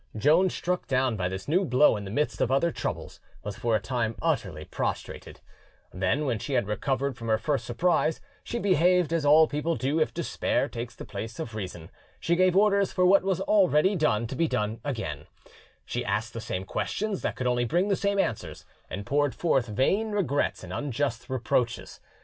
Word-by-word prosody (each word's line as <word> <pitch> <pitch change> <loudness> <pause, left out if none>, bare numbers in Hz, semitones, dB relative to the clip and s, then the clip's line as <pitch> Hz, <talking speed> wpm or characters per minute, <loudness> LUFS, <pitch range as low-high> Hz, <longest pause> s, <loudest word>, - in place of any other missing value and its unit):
Joan, 160 - +4
struck 180 +1 -2
down 130 -2 +1
by 90 -3 -1
this 95 +1 -6
new 175 +6 +2
blow 140 -4 +4
in 100 -1 -5
the - - -6
midst 115 0 -1
of - - +2
other 140 +6 +2
troubles, - - -5 0.2
was 105 -1 -5
for 115 +1 0
a - - +2
time 115 -3 -2
utterly 100 - -1
prostrated; - - -5 0.5
then, 95 +11 0
when 120 -5 -1
she 140 - -4
had 120 -4 +2
recovered 135 +6 -1
from 115 -1 -8
her 110 -1 +3
first 135 +5 -1
surprise, 160 +5 +1 0.2
she 235 - -4
behaved 180 -4 +3
as 165 -3 0
all 155 +2 +7
people 150 +3 -1
do 140 +4 0
if 155 - +1
despair 165 -4 -1
takes 120 -2 -6
the - - -9
place 110 +2 -6
of 115 - -5
reason: 90 -6 -7 0.3
she 170 - +1
gave 185 +1 +3
orders 200 -1 +3
for 180 - +2
what 195 +2 +6
was 190 -1 -1
already 190 -2 +3
done 135 - +1
to 125 - -5
be 165 +4 +1
done 105 -3 -2
again, 80 - -4 0.6
she - - -3
asked 105 +4 -2
the 115 - -5
same 95 -4 -4
questions 205 - -2
that - - -2
could 130 - -4
only 125 -1 +2
bring 175 - +1
the 200 - +2
same 200 +1 0
answers, 115 - -2 0.2
and 100 +2 -5
poured 145 +3 +1
forth 135 -8 +1
vain 190 - +1
regrets 155 -9 0
and - - -7
unjust 140 -3 -2
reproaches. 120 -1 -1
135 Hz, 195 wpm, -27 LUFS, 115-170 Hz, 0.6 s, all